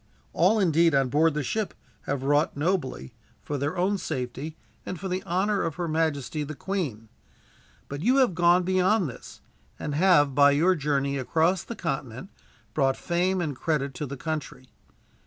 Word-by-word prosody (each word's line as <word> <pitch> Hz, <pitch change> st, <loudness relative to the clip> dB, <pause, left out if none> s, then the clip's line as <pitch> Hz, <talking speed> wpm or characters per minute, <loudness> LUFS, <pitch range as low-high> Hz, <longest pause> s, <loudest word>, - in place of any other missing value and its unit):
All 190 Hz, +7 st, +3 dB
indeed 165 Hz, -4 st, +3 dB
on 135 Hz, -2 st, +2 dB
board 155 Hz, +3 st, +3 dB
the 150 Hz, -, -1 dB
ship 215 Hz, -, -2 dB, 0.3 s
have 135 Hz, -1 st, -2 dB
wrought 145 Hz, +2 st, +1 dB
nobly, 145 Hz, -, -2 dB, 0.3 s
for 145 Hz, -1 st, -3 dB
their 145 Hz, +6 st, -2 dB
own 190 Hz, +3 st, +1 dB
safety 130 Hz, +4 st, -5 dB, 0.3 s
and 185 Hz, -, -6 dB
for 195 Hz, -, -4 dB
the 185 Hz, 0 st, -2 dB
honor 195 Hz, +4 st, +1 dB
of 165 Hz, -3 st, -2 dB
her 175 Hz, -1 st, -3 dB
majesty 155 Hz, -2 st, -1 dB
the 150 Hz, +1 st, -6 dB
Queen. 140 Hz, -, -4 dB, 0.8 s
But 140 Hz, +1 st, -6 dB
you 250 Hz, +9 st, +3 dB
have 255 Hz, -8 st, +4 dB
gone 175 Hz, +1 st, +4 dB
beyond 185 Hz, +1 st, +2 dB
this; 125 Hz, -, -11 dB, 0.4 s
and 150 Hz, -, -4 dB
have, 145 Hz, -4 st, +4 dB
by 145 Hz, +1 st, +6 dB
your 170 Hz, +6 st, +4 dB
journey 140 Hz, -3 st, -1 dB
across 165 Hz, +7 st, +1 dB
the 235 Hz, -, -7 dB
continent, 135 Hz, -, -4 dB, 0.4 s
brought 135 Hz, -3 st, +1 dB
fame 180 Hz, +2 st, 0 dB
and 150 Hz, -5 st, -2 dB
credit 140 Hz, -1 st, -1 dB
to 145 Hz, +3 st, -5 dB
the 140 Hz, +1 st, -6 dB
country. 150 Hz, -3 st, -5 dB
155 Hz, 170 wpm, -26 LUFS, 140-185 Hz, 0.8 s, by